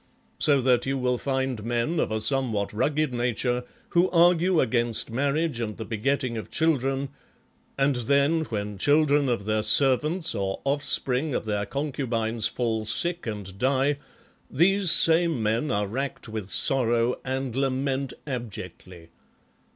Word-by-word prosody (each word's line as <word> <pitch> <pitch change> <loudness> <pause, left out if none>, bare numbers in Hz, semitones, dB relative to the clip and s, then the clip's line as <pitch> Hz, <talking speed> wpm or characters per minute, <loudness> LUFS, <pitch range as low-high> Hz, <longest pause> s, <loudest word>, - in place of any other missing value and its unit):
So 140 -2 +3
that 125 -1 +1
you 135 0 -1
will 125 -1 -1
find 130 -4 -2
men 120 +8 -1
of - - -1
a 110 0 -2
somewhat 115 -6 -1
rugged 145 +5 -1
nature 125 +1 -1 0.2
who 175 +2 +2
argue 175 0 +3
against 120 -3 0
marriage 140 +2 -1
and 110 -3 -4
the 110 - -6
begetting 120 +2 -2
of - - -9
children, 135 -4 0 0.7
and 135 0 +1
then, 140 +6 +1
when 105 -4 -5
children 145 +1 +2
of 115 -5 -2
their 110 0 0
servants, 140 - +4
or 95 -3 -3
offspring 140 0 0
of - - -3
their 105 -1 -2
concubines 120 -6 -2
fall 115 -3 -2
sick 170 +9 0
and 100 -3 -6
die, 135 +3 +1 0.5
these 190 +6 +2
same 165 -6 +6
men 115 +7 0
are 105 0 0
racked 130 +6 -5
with 110 -3 -6
sorrow 120 -1 +1
and 130 -2 -4
lament 135 0 -1
abjectly. 95 - -8
130 Hz, 140 wpm, -25 LUFS, 110-145 Hz, 0.7 s, same